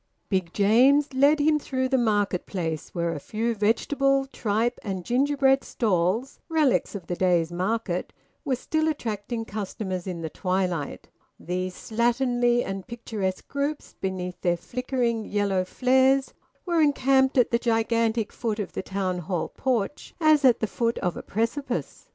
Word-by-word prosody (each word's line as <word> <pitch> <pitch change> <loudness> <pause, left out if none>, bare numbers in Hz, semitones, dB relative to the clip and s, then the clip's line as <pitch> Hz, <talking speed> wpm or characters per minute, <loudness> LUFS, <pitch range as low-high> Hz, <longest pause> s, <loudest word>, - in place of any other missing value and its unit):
Big 185 -4 0
James 260 +9 +4
led 285 +3 +4
him 300 +1 +3
through 260 -2 -1
the 265 - +1
market 205 -6 +1
place, 165 -5 -3
where 170 -1 -2
a 150 - -5
few 225 +9 -2
vegetable, 270 +6 +2
tripe, 230 -2 -1
and 190 -4 -4
gingerbread 270 +1 +3
stalls 210 +3 0
relics 310 -9 +2
of 190 - -6
the 175 - -3
day's 175 -2 +2
market 185 0 -2 0.3
were 275 -5 0
still 315 +5 -1
attracting 225 -5 -3
customers 195 -3 -4
in 175 -3 -4
the 160 - -3
twilight. 180 -5 -2 0.3
These 180 +1 -3
slatternly 240 +1 +1
and 195 -1 -5
picturesque 215 -5 -4
groups, 285 +1 -3
beneath 180 -1 -4
their 175 -1 +1
flickering 240 +2 -2
yellow 200 -3 0
flares, 265 +4 +2 0.3
were 340 -3 +2
encamped 270 -2 +3
at 245 - +4
the 235 - +2
gigantic 230 -1 +1
foot 220 -3 -2
of 210 - -4
the - - -3
Town 190 -2 -2
Hall 175 -1 -2
porch 250 -1 -2
as 310 -2 +4
at 255 -3 +5
the - - +2
foot 230 +2 -1
of 180 - -1
a - - -5
precipice. 230 +7 -3
225 Hz, 150 wpm, -26 LUFS, 190-265 Hz, 0.3 s, at